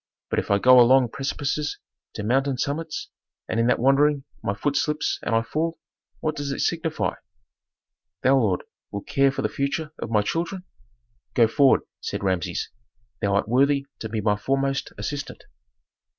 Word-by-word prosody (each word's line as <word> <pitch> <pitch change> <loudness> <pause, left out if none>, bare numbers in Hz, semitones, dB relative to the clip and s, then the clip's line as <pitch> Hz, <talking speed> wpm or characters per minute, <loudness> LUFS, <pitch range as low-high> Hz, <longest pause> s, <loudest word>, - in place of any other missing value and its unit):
"But - - +2
if - - -4
I 100 - +4
go 125 +4 +7
along 125 0 +6
precipices 145 +3 -2 0.4
to 105 - -4
mountain 135 +4 +1
summits, 155 +5 -3 0.4
and 110 - -1
in 115 - +3
that 125 - +3
wandering 140 +3 +3 0.2
my 100 - -1
foot 145 +8 -1
slips 150 +1 0
and 115 - 0
I 115 - +3
fall, 165 +7 -2 0.4
what 155 -1 -1
does 145 -1 -3
it - - -3
signify? 165 -2 0 1.1
Thou, 135 +1 +5
lord, 105 -9 +1 0.3
wilt 100 - -6
care 140 -1 +3
for 135 - -4
the - - +2
future 145 +3 -2
of - - -4
my 105 -2 +2
children?" 170 - -2 0.7
"Go 115 -2 +6
forward," 135 +4 +4 0.2
said - - -4
Rameses. 95 -3 -1 0.5
"Thou 100 -2 +1
art 100 - +1
worthy 140 +4 +3
to 110 - -5
be 110 0 -2
my 105 0 +2
foremost 135 +4 -1
assistant." 145 -1 -5
135 Hz, 165 wpm, -24 LUFS, 115-145 Hz, 1.1 s, go